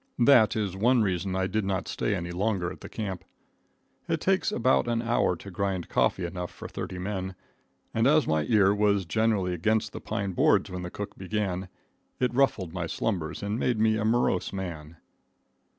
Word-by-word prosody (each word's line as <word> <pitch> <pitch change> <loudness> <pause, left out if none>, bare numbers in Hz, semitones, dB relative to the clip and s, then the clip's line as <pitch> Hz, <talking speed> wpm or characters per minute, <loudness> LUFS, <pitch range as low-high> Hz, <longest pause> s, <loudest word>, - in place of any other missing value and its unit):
That 120 -3 +5
is 100 -4 -1
one 120 +4 +3
reason 95 -1 -1
I 95 0 +1
did 105 +3 -1
not 95 -1 -2
stay 105 - -1
any 85 -1 -4
longer 90 -1 -1
at - - -11
the - - -9
camp. 95 -5 -5 0.8
It - - 0
takes - - +1
about 65 - +2
an 120 -1 +1
hour 115 -5 +1
to 100 +3 -10
grind 95 -1 -2
coffee 90 - +1
enough 90 0 -4
for - - -9
thirty 90 - -6
men, 95 0 -4 0.6
and 115 +2 +3
as 150 +1 +4
my 80 -1 +1
ear 100 -4 +4
was 100 -2 +2
generally 105 -1 +1
against 110 +5 0
the - - -7
pine 100 -1 -3
boards 90 - +3
when 90 0 -4
the 90 - -5
cook 105 +2 -7
began, 95 -1 -2 0.5
it 125 -1 +1
ruffled 115 -10 +1
my 85 -3 -3
slumbers 85 -2 -2
and 105 +3 -2
made 120 -4 +1
me 110 0 +3
a 110 - -1
morose 110 -4 +1
man. 85 -5 -6
100 Hz, 185 wpm, -27 LUFS, 90-110 Hz, 0.8 s, That